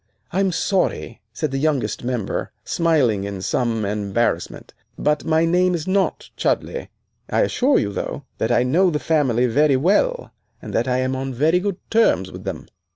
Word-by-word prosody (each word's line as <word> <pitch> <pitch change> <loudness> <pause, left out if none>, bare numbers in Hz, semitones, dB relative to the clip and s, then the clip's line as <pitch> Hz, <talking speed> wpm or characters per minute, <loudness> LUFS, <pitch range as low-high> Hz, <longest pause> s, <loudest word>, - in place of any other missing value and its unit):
"I'm 190 +1 +1
sorry," 190 +2 -1
said 155 -4 -3
the 135 - -1
youngest 145 -5 0
member, 120 -4 -2
smiling 145 - +2
in 100 -1 -5
some 115 -3 0
embarrassment, 105 +2 -2 0.2
"but 150 0 0
my 160 +1 +3
name 180 +2 +2
is 160 -2 -4
not 190 +1 0
Chudleigh. 485 - -1 0.4
I - - +2
assure 270 +3 +2
you, 100 -1 -1
though, - - -4 0.2
that - - 0
I - - +3
know 170 +9 +3
the 155 - 0
family 135 -7 +1
very 140 +3 +3
well, 355 - +1 0.3
and - - -9
that 120 +3 +1
I 125 0 +1
am 130 +1 0
on 135 0 -4
very 160 +7 +3
good 195 -1 -2
terms 95 - +3
with - - -10
them." - - -5
150 Hz, 170 wpm, -21 LUFS, 120-180 Hz, 0.4 s, my